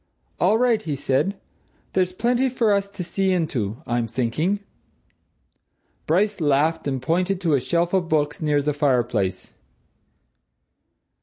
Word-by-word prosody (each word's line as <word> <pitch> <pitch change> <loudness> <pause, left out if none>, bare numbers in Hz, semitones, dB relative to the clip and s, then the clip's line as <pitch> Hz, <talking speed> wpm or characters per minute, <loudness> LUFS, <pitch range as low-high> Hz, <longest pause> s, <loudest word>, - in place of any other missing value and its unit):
"All 195 +5 +4
right," 240 -2 +2
he 150 -3 -3
said. 140 +9 0 0.5
"There's 185 -1 +1
plenty 240 +6 +1
for 230 -4 +2
us 200 0 0
to 200 -2 -6
see 190 +2 0
into, 130 - -2
I'm 120 -1 -1
thinking!" 130 - -1 1.5
Bryce 195 +4 +1
laughed 150 +2 +1
and 135 -2 -1
pointed 180 +8 0
to 165 -4 +1
a 135 - +3
shelf 170 +5 0
of 180 -3 +1
books 150 -1 0
near 150 -2 +1
the 150 +1 0
fireplace. 120 -10 0
165 Hz, 135 wpm, -23 LUFS, 135-195 Hz, 1.5 s, All